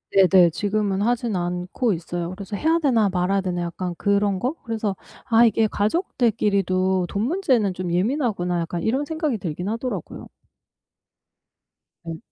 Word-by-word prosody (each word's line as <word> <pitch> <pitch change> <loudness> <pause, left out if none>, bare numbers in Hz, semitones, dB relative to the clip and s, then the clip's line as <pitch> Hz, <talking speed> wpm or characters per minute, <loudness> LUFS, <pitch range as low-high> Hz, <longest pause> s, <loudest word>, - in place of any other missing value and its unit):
네네, 185 -2 +6
지금은 205 +1 -1
하진 235 -1 0
않고 180 +6 -1
있어요. 175 -1 -3
그래서 200 +2 -7
해야 320 +9 +2
되나 235 -9 +2
말아야 190 +1 0
되나 180 -2 -2
약간 175 +1 -4
그런 200 -1 +1
거? 255 +8 -1
그래서 220 -4 -2 0.3
'아 230 -2 +5
이게 220 0 +3
가족들끼리도 200 - 0
돈 200 - -2
문제는 255 - +1
좀 180 -1 -4
예민하구나.' 185 - 0
약간 170 +1 -4
이런 260 +6 +1
생각이 310 -4 -2
들긴 180 -1 -5
하더라고요. 230 +4 -4 1.8
네. 165 -1 -6
200 Hz, 320 characters per minute, -23 LUFS, 180-230 Hz, 1.8 s, 네네